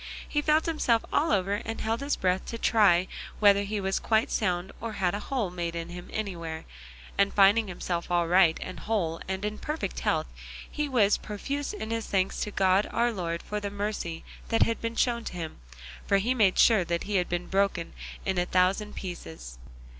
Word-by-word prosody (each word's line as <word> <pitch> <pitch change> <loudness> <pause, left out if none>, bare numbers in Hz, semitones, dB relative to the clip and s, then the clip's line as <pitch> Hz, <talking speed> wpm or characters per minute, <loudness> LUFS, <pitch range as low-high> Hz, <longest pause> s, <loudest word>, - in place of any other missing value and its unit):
He 295 - 0
felt 305 +1 +3
himself 255 -8 +1
all 320 +3 +2
over 200 +1 +1
and 225 0 -5
held 225 +1 -1
his 280 +1 -1
breath 185 0 0
to 230 - -4
try 195 -6 +4 0.3
whether 200 -1 +6
he 205 +1 -2
was 195 0 0
quite 220 0 +1
sound 185 -2 0
or 230 -1 -4
had 185 -3 0
a 205 - -2
hole 225 -5 -2
made 170 -1 -3
in 170 0 -4
him 175 0 -9
anywhere, 170 -7 -4 0.5
and 200 0 +4
finding 205 +2 +5
himself 175 -1 -3
all 175 -1 +2
right 175 -2 +5
and 185 - -7
whole 175 -7 -1
and 190 +1 -3
in 210 0 -3
perfect 305 +2 -3
health - - +1 0.4
he 295 -1 -3
was 215 -6 +3
profuse 275 +7 -4
in 225 - -5
his 230 -1 -2
thanks 190 -1 0
to - - -1
God 190 0 +2
our 235 +1 +1
Lord 170 -5 -3
for 210 - -3
the 205 -1 -4
mercy 200 -5 -4 0.2
that 225 - +3
had 230 - -1
been 230 0 -3
shown 235 -1 +1
him, 165 -3 -6 0.5
for 200 - +4
he 225 +6 +1
made 210 -7 +3
sure 220 -6 +6 0.2
he 205 0 0
had 180 - 0
been 175 0 -2
broken 195 -3 0 0.3
into 190 -2 +1
a - - 0
thousand 190 +4 +1
pieces. 80 - -7
200 Hz, 195 wpm, -28 LUFS, 180-225 Hz, 0.5 s, whether